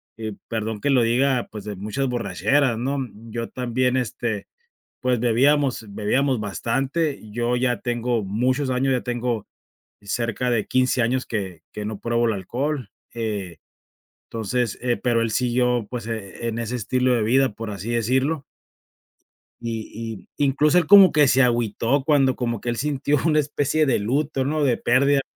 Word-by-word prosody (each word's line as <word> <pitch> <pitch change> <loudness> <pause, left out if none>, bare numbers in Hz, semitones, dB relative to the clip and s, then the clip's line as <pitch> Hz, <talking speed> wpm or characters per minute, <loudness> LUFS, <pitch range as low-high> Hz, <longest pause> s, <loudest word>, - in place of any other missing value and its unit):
y 110 -1 -5 0.2
perdón 110 -1 -3
que 145 - 0
lo 130 -2 +4
diga, 125 +2 +1
pues, 105 -2 -8
de 105 - -5
muchas 105 +8 -2
borracheras, 125 +1 +1
¿no?, 135 +4 -1 0.3
yo 115 0 -4
también, 125 +1 0
este, 120 -4 -3 0.5
pues, 125 -3 +1
bebíamos 130 0 +2
bebíamos 120 +5 0
bastante, 135 - -1
yo 120 +2 -1
ya 125 -1 +1
tengo 120 -2 -1
muchos 130 +7 0
años, 130 +1 +1
ya 125 - 0
tengo 120 -3 -2 0.5
cerca 115 +4 -2
de 115 -3 0
15 130 0 +2
años 125 +3 0
que 95 -7 -4
que 105 - -6
no 105 0 -4
pruebo 120 0 +1
el 110 - +1
alcohol, 125 +5 -3 0.3
eh, 105 -7 -3 0.7
entonces, 115 +1 -2
eh, 120 -1 +1
pero 120 -2 +2
él 115 -1 0
siguió, 125 -2 +1
pues, 120 -3 -5
e 110 0 -5
en 115 0 -2
ese 115 +1 -3
estilo 125 +3 +1
de 110 - +1
vida, 130 +4 +3
por 110 +1 -6
así 100 +3 -6
decirlo 130 +6 +1 1.2
y 115 -2 -6
y 145 - +2
incluso 150 +5 +3
él 165 -4 +3
como 195 -1 +9
que 150 -3 +4
se 130 +1 +4
agüitó, 120 +2 +1
cuando 135 -3 +3
como 120 -3 -2
que 120 - -3
él 120 - -2
sintió 145 0 0
una 155 -2 +4
especie 145 +1 +1
de 130 -6 +2
luto, 135 +4 0
¿no?, 155 +1 0
de 125 -4 +2
pérdida 140 +1 +3
120 Hz, 165 wpm, -23 LUFS, 115-135 Hz, 1.2 s, como